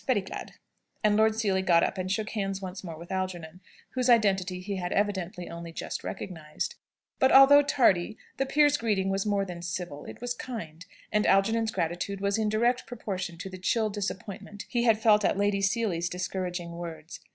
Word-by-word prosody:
Very 250 -6 +3
glad." 190 - -8 0.5
And 210 -1 +4
Lord 220 0 +4
Seely 200 -4 +1
got 170 -3 +4
up - - -1
and 185 0 -2
shook 215 +1 -1
hands 195 -3 -2
once 190 +1 -7
more 165 -3 -7
with 170 +2 -10
Algernon, 185 -2 -4 0.3
whose 255 -1 0
identity 190 -6 +3
he 195 +2 -4
had 180 -1 -3
evidently 190 -3 -1
only 170 0 -7
just - - -5
recognised. 165 - -5 0.5
But, 265 - +4
although 275 +2 +9
tardy, 225 -9 +2 0.2
the 270 - 0
peer's 290 0 +4
greeting 205 -5 0
was 195 +2 -1
more 200 -1 +1
than 175 -2 -7
civil, 175 -4 -5
it - - -9
was 245 0 -2
kind; 185 -10 -7 0.2
and 210 -1 +2
Algernon's 220 +3 +3
gratitude 180 +1 -2
was 200 +2 0
in 215 -1 +1
direct 235 +4 +1
proportion 190 -7 -5
to 190 - -6
the 185 - -8
chill 215 +3 +1
disappointment 205 0 -5
he 240 -1 0
had 225 -2 +5
felt 215 -1 +4
at - - +2
Lady 200 0 +1
Seely's 195 -5 0
discouraging 180 -1 -4
words. 170 -1 -8
195 Hz, 185 wpm, -28 LUFS, 180-220 Hz, 0.5 s, although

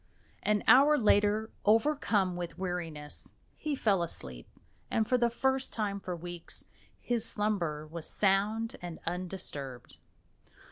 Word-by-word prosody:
An 210 -1 +1
hour 290 +4 +7
later, 210 -1 +3
overcome 215 -5 +3
with 175 -1 -5
weariness, 170 -5 -4 0.2
he 305 -2 -2
fell 200 -8 +2
asleep, 65 - -5 0.4
and 220 -1 +1
for 255 - +3
the 240 -1 +3
first 265 +2 0
time 205 -3 -1
for 180 -2 -4
weeks 175 0 -6 0.3
his 240 -2 -1
slumber 175 -8 -1
was 160 +1 -7
sound 210 +3 +1
and 175 -2 -6
undisturbed. 165 -8 -4
200 Hz, 125 wpm, -31 LUFS, 170-225 Hz, 0.4 s, hour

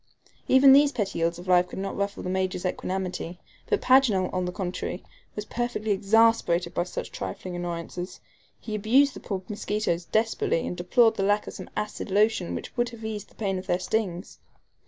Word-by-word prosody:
Even 265 +1 +7
these 285 +1 +6
petty 205 -9 -2
ills 170 +1 +1
of 175 +1 -10
life 180 0 +4
could - - -9
not 195 +1 -3
ruffle 200 0 -3
the 180 - -3
Major's 185 -1 -1
equanimity; 185 -1 -3 0.3
but 430 - +1
Paganel, 250 -8 +4
on 185 -1 0
the 180 - -2
contrary, 180 -1 -4 0.3
was 210 - -4
perfectly 240 -2 -2
exasperated 200 -4 +3
by 175 - 0
such 180 - -6
trifling 185 -1 -6
annoyances. 175 +1 -5 0.4
He 215 - -7
abused 250 +7 +3
the - - -9
poor 190 -2 -4
mosquitoes 205 -4 -2
desperately, 220 -6 0
and - - -3
deplored 225 +6 +3
the 195 - 0
lack 205 +1 +2
of - - -7
some - - -9
acid 210 0 -4
lotion 205 -2 +2
which - - -7
would 240 -1 +1
have 230 -2 -10
eased 215 -2 -5
the - - -24
pain 195 -3 -1
of 185 - -10
their 175 - +2
stings. 185 -1 -3
195 Hz, 190 wpm, -26 LUFS, 180-225 Hz, 0.4 s, Even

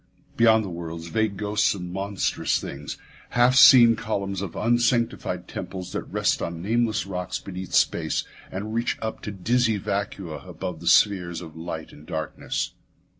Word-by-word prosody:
Beyond 110 -2 +5
the - - -5
worlds 85 -1 -6
vague 110 -1 0
ghosts 105 0 +1
of 90 - -6
monstrous 95 +3 -1
things; 70 +1 -6 0.4
half 120 +1 +6
seen 125 -4 +9
columns 100 -4 -3
of 100 -5 -5
unsanctified 120 +1 +1
temples 90 -1 -6
that - - -2
rest - - +1
on 85 -1 -4
nameless 110 +3 0
rocks 90 -1 -3
beneath 95 -1 -6
space 80 -2 +2 0.3
and 105 +3 -5
reach 115 +1 0
up 110 0 -4
to 105 - -5
dizzy 115 +3 +1
vacua 100 -4 -4
above 90 -4 -5
the 85 - -8
spheres 90 -4 +4
of 80 -3 -10
light 80 -1 -6
and 75 - -15
darkness. 80 -6 -3
100 Hz, 155 wpm, -25 LUFS, 85-110 Hz, 0.4 s, seen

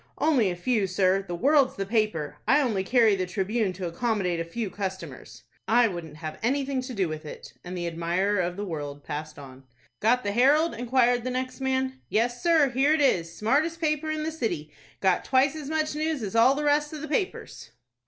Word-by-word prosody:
"Only 265 -11 +3
a 175 - -3
few, 205 +2 0
sir. 185 +1 +2
The 175 - -4
'World''s 275 - +3
the 195 - -3
paper! 210 -8 -1
I 285 - +5
only 220 -9 0
carry 225 -1 +4
the 185 -1 -2
'Tribune' 195 +3 -1
to 180 0 -6
accommodate 180 -1 -1
a - - -1
few 195 +4 -5
customers." 190 -2 -7 0.2
"I 235 +1 +5
wouldn't 170 -6 -7
have 155 -1 -7
anything 270 +2 0
to 255 -1 -7
do 190 -3 +1
with 155 0 -6
it." 150 - -10
And 180 +1 -6
the 175 - -3
admirer 170 +4 0
of 175 0 -1
the 205 - -3
"World" 145 -5 -6
passed 155 +1 -6
on. 135 -2 -12 0.4
"Got 245 +4 +2
the 205 - -1
'Herald'?" 285 +9 +3
inquired 245 0 +2
the 255 - -2
next 255 +1 -4
man. 260 0 -1
"Yes, 240 +2 0
sir, 320 -6 +4
here 270 +4 +3
it 315 - +1
is. 170 -12 +1
Smartest 300 +10 +1
paper 310 -1 -1
in 310 0 -2
the 320 - -2
city! 175 - -4 0.3
Got 190 -2 +2
twice 270 +2 +2
as 300 -2 -6
much 310 -1 -1
news 305 -3 -2
as 200 +1 -5
all 240 +4 +5
the 300 - -2
rest 295 +1 +1
of 305 - -6
the 310 - -5
papers." 370 +6 -3
230 Hz, 210 wpm, -26 LUFS, 180-275 Hz, 0.4 s, I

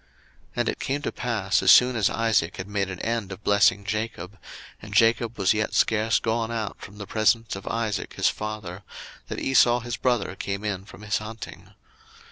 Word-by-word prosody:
01:027:030 - - -34 0.5
And - - 0
it - - -4
came 140 +2 -2
to - - -2
pass, 110 -6 0
as 95 -1 +6
soon 125 0 +6
as 105 -4 +2
Isaac 110 -7 +1
had 95 - -6
made 100 -2 -1
an 95 -2 -6
end 115 -4 -2
of 95 +2 -9
blessing 100 0 +3
Jacob, 105 -2 -4 0.4
and - - -8
Jacob 115 0 +3
was 100 -1 +3
yet 110 0 -2
scarce 110 0 +3
gone 115 0 -1
out 110 -3 -4
from 100 +1 -11
the 105 - -7
presence 110 +1 +1
of 95 - -9
Isaac 115 -2 -2
his - - +2
father, 105 -4 -4 0.5
that - - -5
Esau 120 -2 +4
his 120 +1 -4
brother 120 -7 0
came 100 +1 -4
in 100 -2 -3
from 105 - -13
his 105 0 0
hunting. 110 +1 -9
110 Hz, 195 wpm, -25 LUFS, 100-115 Hz, 0.5 s, as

